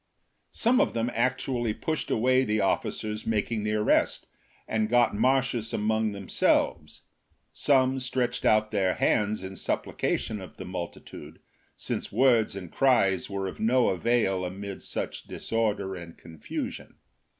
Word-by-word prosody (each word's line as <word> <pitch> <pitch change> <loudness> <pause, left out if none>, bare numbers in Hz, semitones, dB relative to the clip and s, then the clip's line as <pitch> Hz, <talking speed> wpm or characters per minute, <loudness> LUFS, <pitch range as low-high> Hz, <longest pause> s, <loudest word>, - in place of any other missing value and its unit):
Some 250 +3 +4
of 285 - 0
them 115 +1 0
actually 120 -1 0
pushed 160 -1 -3
away 130 +3 +3
the 105 -3 0
officers 105 +2 -1
making 110 0 0
the 105 0 -1
arrest, 105 0 +2 0.4
and 110 -1 0
got 120 -2 +3
Marcius 130 -2 +1
among 110 +1 +1
them 100 -2 -8
selves; - - +1 0.5
some 130 -2 +3
stretched 130 -1 -1
out 110 0 +3
their 95 -3 +1
hands 105 -1 +1
in 95 0 -6
supplica - - -1
tion 105 -2 -5
of 95 - -11
the - - -7
multitude, 90 -2 -8 0.4
since - - -4
words 115 -2 +3
and 90 -4 -7
cries 110 -9 +2
were 100 -1 -3
of 95 - -7
no 120 +3 +3
avail 95 -1 +1
amid 95 +2 -6
such - - -5
disorder 105 -4 -2
and 85 -2 -10
confusion. 80 -2 -7
110 Hz, 140 wpm, -27 LUFS, 100-125 Hz, 0.5 s, Some